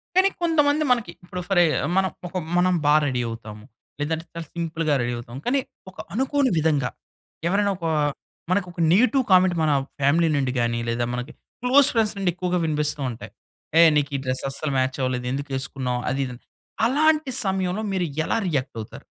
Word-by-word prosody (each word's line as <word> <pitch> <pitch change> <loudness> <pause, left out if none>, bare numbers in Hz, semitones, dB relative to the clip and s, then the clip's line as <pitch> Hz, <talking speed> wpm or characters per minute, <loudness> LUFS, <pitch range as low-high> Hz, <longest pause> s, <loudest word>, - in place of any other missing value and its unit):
కానీ 380 +1 +5
కొంతమంది 305 -3 +3
మనకి, 230 -8 +1
ఇప్పుడు 180 0 -6
ఫరె 175 -3 +5 0.3
మనం 190 -1 +3 0.2
ఒక 185 +1 -5 0.2
మనం 180 +1 +3
బా 150 - +5
రెడీ 125 -3 0
అవుతాము. 110 -2 -9 0.4
లేదంటే, 160 +2 -2
చాలా 170 -1 -6
సింపుల్‌గా 165 -2 -1
రెడీ 120 0 -1
అవుతాము. 120 +2 -8
కానీ, 275 +3 +2 0.3
ఒక 185 - -19 0.2
అనుకోని 265 +3 +1
విధంగా, 145 -5 +1 0.6
ఎవరైనా 200 +3 +2
ఒక 170 - -6 0.7
మనకు 185 0 +1
ఒక 170 -1 -5
నెగెటివ్ 255 +7 +4
కామెంట్ 185 -1 +5
మన 155 - +2 0.3
ఫ్యామిలీ 155 +5 +3
నుండి 135 -3 0
గాని, 120 0 0
లేదా 120 +1 0
మనకి 125 +4 -4 0.3
క్లోజ్ 265 +3 +5
ఫ్రెండ్స్ 220 -2 +2
నుండి 195 -2 +1
ఎక్కువగా 180 0 -1
వినిపిస్తూ 150 -1 -1
ఉంటాయి. 115 - -10 0.5
ఏ, - - +10
నీకు 145 -1 +1
ఈ - - -4
డ్రెస్ 130 0 -1
అస్సలు 140 +2 -2
మ్యాచ్ 130 0 0
అవ్వలేదు 125 -1 -1
ఎందుకు 140 +1 -4
వేసుకున్నావు? 130 -2 -2
అది, 135 +2 -1
ఇది 125 - -6
అని. 120 - -13 0.4
అలాంటి 300 +2 +2
సమయంలో 190 +1 -1
మీరు 180 -2 0 0.2
ఎలా - - 0
రియాక్ట్ 140 -8 -2
అవుతారు? 105 - -11
170 Hz, 175 wpm, -24 LUFS, 130-200 Hz, 0.7 s, ఏ